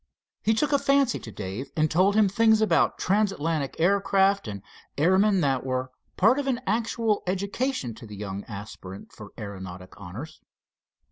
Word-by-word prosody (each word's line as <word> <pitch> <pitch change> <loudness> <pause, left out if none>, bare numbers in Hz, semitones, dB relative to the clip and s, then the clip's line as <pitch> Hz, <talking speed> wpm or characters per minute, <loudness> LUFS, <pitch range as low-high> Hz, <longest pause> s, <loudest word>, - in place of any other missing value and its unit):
He 220 +1 +2
took 290 +6 +1
a 285 - +4
fancy 275 -2 +2
to - - -9
Dave, 100 +6 -6
and 155 -1 +2
told 190 +5 +3
him 215 -1 +5
things 220 +2 +4
about 165 - +2
transatlantic 165 -8 0
aircraft 195 - +3
and 100 -2 -6 0.3
airmen 190 +5 +3
that 135 -4 +1
were 130 0 -2 0.3
part 225 +8 +4
of 280 - -3
an 255 -2 0
actual 225 0 0
education 200 - -2
to 115 +1 -12
the 105 - -9
young 100 -1 -5
aspirant 100 -2 -9
for 105 -1 -11
aeronautic 95 -3 -8
honors. 120 - -9
175 Hz, 155 wpm, -26 LUFS, -, 0.3 s, him